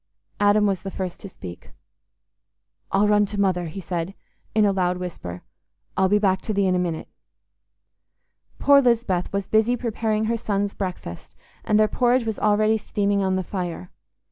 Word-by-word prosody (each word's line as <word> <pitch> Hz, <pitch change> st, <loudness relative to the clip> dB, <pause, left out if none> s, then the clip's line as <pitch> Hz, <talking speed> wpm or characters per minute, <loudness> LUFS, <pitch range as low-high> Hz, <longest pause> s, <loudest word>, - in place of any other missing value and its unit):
Adam 205 Hz, +1 st, +4 dB
was 195 Hz, -3 st, 0 dB
the 195 Hz, -, -5 dB
first 185 Hz, -2 st, -5 dB
to 200 Hz, -, -9 dB
speak. 90 Hz, -, -11 dB, 1.2 s
"I'll 200 Hz, +2 st, +3 dB
run 210 Hz, 0 st, +4 dB
to 205 Hz, +1 st, -5 dB
Mother," 185 Hz, -3 st, +1 dB
he 160 Hz, +5 st, -7 dB
said, 175 Hz, +1 st, -4 dB, 0.4 s
in 215 Hz, -1 st, +5 dB
a 200 Hz, -, +4 dB
loud 180 Hz, -2 st, 0 dB
whisper. 130 Hz, -, -6 dB, 0.5 s
"I'll 190 Hz, 0 st, +3 dB
be 205 Hz, -, +4 dB
back 190 Hz, -2 st, +2 dB
to 215 Hz, -, -3 dB
thee 200 Hz, 0 st, +2 dB
in 185 Hz, -, +2 dB
a 180 Hz, -, +1 dB
minute." 170 Hz, -3 st, -2 dB, 1.5 s
Poor 280 Hz, 0 st, +6 dB
Lisbeth 230 Hz, -8 st, +1 dB
was 200 Hz, 0 st, -2 dB
busy 220 Hz, +3 st, +3 dB
preparing 220 Hz, -2 st, -1 dB
her 230 Hz, +1 st, 0 dB
sons' 205 Hz, -2 st, -1 dB
breakfast, 180 Hz, -, -6 dB, 0.3 s
and 215 Hz, 0 st, +2 dB
their 215 Hz, -, +5 dB
porridge 245 Hz, +1 st, +2 dB
was 220 Hz, -2 st, -3 dB
already 215 Hz, +1 st, +3 dB
steaming 200 Hz, -1 st, 0 dB
on 190 Hz, -1 st, +1 dB
the 185 Hz, -, -1 dB
fire. 180 Hz, -1 st, -5 dB
200 Hz, 170 wpm, -23 LUFS, 180-215 Hz, 1.5 s, Poor